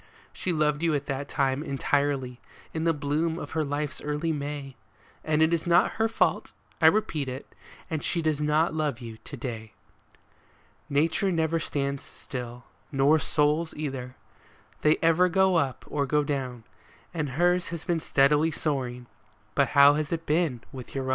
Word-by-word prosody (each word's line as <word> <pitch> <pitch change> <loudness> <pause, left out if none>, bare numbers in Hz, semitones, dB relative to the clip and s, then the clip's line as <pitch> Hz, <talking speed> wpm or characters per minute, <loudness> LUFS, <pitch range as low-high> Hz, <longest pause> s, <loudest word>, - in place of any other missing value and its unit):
She 185 - -2
loved 150 -2 +1
you 165 -2 +2
at 140 0 -2
that 140 +1 -4
time 135 0 0
entirely, 140 -3 -1 0.3
in 160 0 -2
the 165 - +3
bloom 150 +3 -1
of 145 - -7
her 160 -1 0
life's 145 +1 -3
early 150 +2 -1
May, 145 -2 -4 0.5
And 155 0 +2
it 160 +1 +3
is 170 0 -1
not 175 +1 +3
her 225 - +4
fault, 225 - 0 0.3
I - - +7
repeat 155 -10 +2
it, 130 +2 -6 0.4
that 160 -4 -3
she 175 - 0
does 155 -2 0
not 150 +2 +2
love 150 -5 -1
you 115 -3 -8
to 140 - -8
day. 115 -3 -6 1.2
Nature 160 +7 +2
never 165 -1 +1
stands 140 -3 -2
still, 125 -2 -8 0.3
nor 140 +3 +4
souls 150 +3 +1
either. 130 -4 -5 0.7
They 155 +1 +4
ever 165 +2 +4
go 190 0 +3
up 135 -5 -1
or 140 -1 -1
go 150 +2 +2
down; 130 -5 -3 0.5
And 150 -5 -3
hers 175 0 +3
has 170 -1 -6
been 175 -3 +1
steadily 150 +2 +3
soaring, 130 -6 -2 0.3
— - - -36
but - - +3
how 140 +1 +9
has 150 -1 -2
it 165 -1 -2
been 150 -6 +1
with 130 -2 -9
your 135 - -1
own 130 - -4
150 Hz, 175 wpm, -27 LUFS, 135-160 Hz, 1.2 s, how